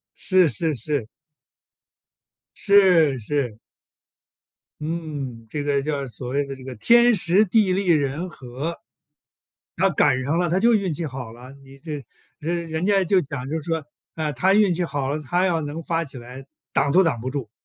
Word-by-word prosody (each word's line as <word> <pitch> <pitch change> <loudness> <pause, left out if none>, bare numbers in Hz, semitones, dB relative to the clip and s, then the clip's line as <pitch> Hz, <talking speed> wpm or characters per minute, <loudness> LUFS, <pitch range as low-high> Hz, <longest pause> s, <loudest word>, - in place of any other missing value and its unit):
是 185 -3 +3
是 160 0 -1
是。 135 -2 -2 1.5
是 180 - +4
是。 125 -2 -2 1.2
嗯， 150 -8 -5
这 145 +5 -3
个 140 -1 +1
叫 140 -1 -2
所 125 0 -8
谓 140 +2 0
的 140 - -6
这 130 - -13
个 130 -1 -7
天 235 - +5
时 185 +3 +3
地 205 -1 +3
利 195 0 -1
人 155 +2 +1
和。 135 +5 -6 1.0
他 190 +2 +3
赶 135 -4 +2
上 150 +5 0
了， 175 0 +1
他 175 +3 +1
就 235 +4 +4
运 195 -4 +1
气 160 +2 -3
好 130 -5 -6
了， 125 +2 -12
你 135 0 -15
这 150 -1 -6 0.4
人 170 +2 -3
人 160 +3 -2
家 195 -2 +3
就 190 +1 +3
讲 140 -5 -6
就 160 +1 -2
说： 160 0 -3 0.3
“啊， 155 -2 -1
他 185 +9 +2
运 205 -4 +4
气 180 - -1
好 140 -4 -2
了， 150 +2 -2
他 175 +6 0
要 170 -3 +1
能 150 +2 -5
发 165 +1 -1
起 140 -4 -9
来 125 +2 -10 0.3
挡 140 +1 +2
都 185 +4 +5
挡 135 -8 0
不 125 - -4
住。“ 130 -6 -5
155 Hz, 190 characters per minute, -23 LUFS, 135-175 Hz, 1.5 s, 天